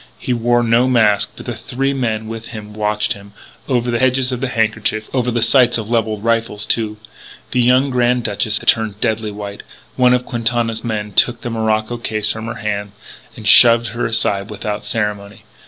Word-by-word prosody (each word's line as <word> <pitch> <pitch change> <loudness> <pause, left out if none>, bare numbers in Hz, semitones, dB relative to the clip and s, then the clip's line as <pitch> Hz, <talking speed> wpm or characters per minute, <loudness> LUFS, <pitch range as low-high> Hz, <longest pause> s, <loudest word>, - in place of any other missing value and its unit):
He 125 - -2
wore 120 0 +2
no 115 +2 +3
mask, 110 -5 +2
but - - -11
the - - -3
three 135 +2 -2
men 110 -5 -2
with 115 0 -7
him 105 -2 -9
watched 105 0 0
him 100 0 -14 0.4
over 120 -2 0
the 120 - -1
edges 130 0 +2
of 125 -1 -4
handkerchiefs, 110 -3 -1
over 125 -2 0
the 120 -1 0
sights 120 0 +4
of 110 0 -6
levelled 110 -3 0
rifles, 115 -2 0
too. 110 -2 -1 0.5
The 125 - +2
youthful 130 +3 +3
Grand 125 -1 +1
Duchess 110 0 0
had - - -5
turned 110 -3 +2
deadly 110 -2 -1
white. 100 0 -7 0.4
One 125 -1 +5
of 125 0 -2
Quintana's 115 -1 -2
men 105 -3 -3
took 120 +4 +2
the 120 - -4
morocco 110 +1 -1
case 110 -2 -2
from 110 0 -6
her 110 - -5
hands 105 -3 -4 0.4
and 110 - -7
shoved 115 +2 +7
her 120 - -2
aside 100 -3 0
without 105 0 -4
ceremony. 105 -2 -3
115 Hz, 190 wpm, -17 LUFS, 105-120 Hz, 0.5 s, shoved